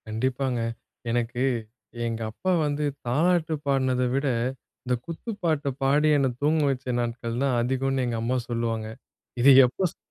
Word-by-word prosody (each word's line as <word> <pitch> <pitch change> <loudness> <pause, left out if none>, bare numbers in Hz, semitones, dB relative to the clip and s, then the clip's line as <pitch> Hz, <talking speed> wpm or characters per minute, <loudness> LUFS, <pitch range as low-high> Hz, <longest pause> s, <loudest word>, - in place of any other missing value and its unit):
கண்டிப்பாங்க. 125 +3 -1 0.5
எனக்கு 120 +1 -1 0.7
எங்க 115 0 -3
அப்பா 185 +11 -2
வந்து 145 0 -1 0.2
தாலாட்டு 160 +5 +2
பாடுனத 130 -2 +2
விட, 140 +2 0 0.6
இந்த 125 - 0
குத்து 170 +7 -6
பாட்ட 155 -3 +1 0.2
பாடி 145 +3 +3
என்ன 140 -1 +2
தூங்க 155 +2 +3
வைச்ச 130 -1 -3
நாட்கள் 120 0 -3
தான் 130 -3 +2
அதிகம்னு 130 +1 0
எங்க 115 -1 -2
அம்மா 125 +2 0
சொல்லுவாங்க. 115 -2 -2 0.5
இத 135 - +7 0.2
எப்ப 130 +10 -1
ஸ் - - -26
130 Hz, 145 wpm, -26 LUFS, 120-145 Hz, 0.7 s, இத